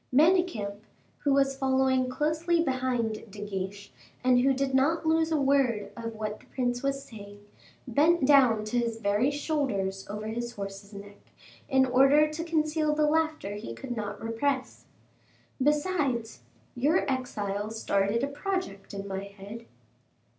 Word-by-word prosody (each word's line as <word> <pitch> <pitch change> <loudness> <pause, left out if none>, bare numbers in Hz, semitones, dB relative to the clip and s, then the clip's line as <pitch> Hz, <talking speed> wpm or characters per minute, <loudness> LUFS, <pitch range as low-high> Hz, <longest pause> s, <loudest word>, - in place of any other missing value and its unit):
Manicamp, 295 - +3 0.4
who 285 - 0
was 275 0 +3
following 265 -1 +2
closely 315 +5 0
behind 255 -6 -1
De 205 +1 -7
Guiche 200 0 -5 0.3
and 250 -1 +5
who 270 +2 +4
did 270 0 -1
not 310 +5 +2
lose 320 0 +2
a 315 - +2
word 270 -6 +2
of 230 -1 -6
what 215 -1 -4
the - - -21
prince 245 -1 -1
was 275 0 -1
saying, 205 -2 -12 0.4
bent 300 +5 +3
down 255 -7 +5
to 240 +3 0
his 230 -1 -2
very 205 +5 +2
shoulders 265 -11 -2
over 210 +1 -5
his 235 +1 -4
horse's 200 0 -7
neck, 200 0 -11 0.5
in 265 -2 +4
order 270 +4 +5
to 305 +2 -5
conceal 310 -2 +1
the 305 0 +3
laughter 315 -8 0
he 115 - -6
could 245 - -6
not 205 -2 -4
repress. 255 +4 -2 0.8
"Besides, 290 - 0 0.3
your 290 +8 +2
exile 215 -6 -2
started 215 +1 0
a - - +1
project 285 - -4
in 200 0 -5
my 195 0 -4
head." 200 +3 -10
255 Hz, 145 wpm, -28 LUFS, 210-290 Hz, 0.8 s, and